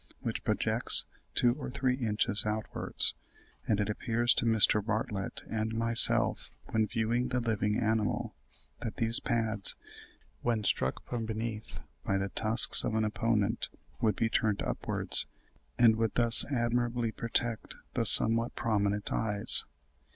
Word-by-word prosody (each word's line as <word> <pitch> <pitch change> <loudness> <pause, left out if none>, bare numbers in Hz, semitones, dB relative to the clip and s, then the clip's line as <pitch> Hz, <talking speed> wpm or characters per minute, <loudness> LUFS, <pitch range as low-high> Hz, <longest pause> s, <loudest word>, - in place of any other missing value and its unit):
67), - - -20
which - - -4
projects - - +1 0.3
two 120 -1 +2
or 135 - -6
three 130 0 -1
inches 110 -3 -2
outwards; 105 0 -2 0.5
and 110 -2 0
it 105 - -1
appeared 115 +2 -3
to 120 - +5
Mr. 110 -2 +3
Bartlett 105 -2 -4
and 110 0 -4
myself, 115 +1 +3 0.2
when 110 -1 0
viewing 115 +3 -2
the 125 0 -2
living 110 -2 -2
animal, 110 -2 -2 0.5
that 115 - -6
these 115 0 +3
pads, 110 -3 -1 0.7
when 115 -3 -2
struck 100 - -2
from 115 -2 -5
beneath 110 0 -6 0.2
by 100 - -1
the 95 0 -3
tusks 110 +3 +3
of 110 - -3
an 110 0 0
opponent, 110 0 -2 0.3
would 110 -2 +1
be 115 - -1
turned 110 -2 -1
upwards, - - -1 0.5
and 115 -2 +4
would 115 -2 -2
thus 120 -1 +4
admirably 120 -2 -2
protect 115 0 -3 0.2
the - - -1
somewhat 115 +1 +7
prominent 105 -2 -1
eyes. 105 -2 +4
110 Hz, 140 wpm, -29 LUFS, 105-115 Hz, 0.7 s, somewhat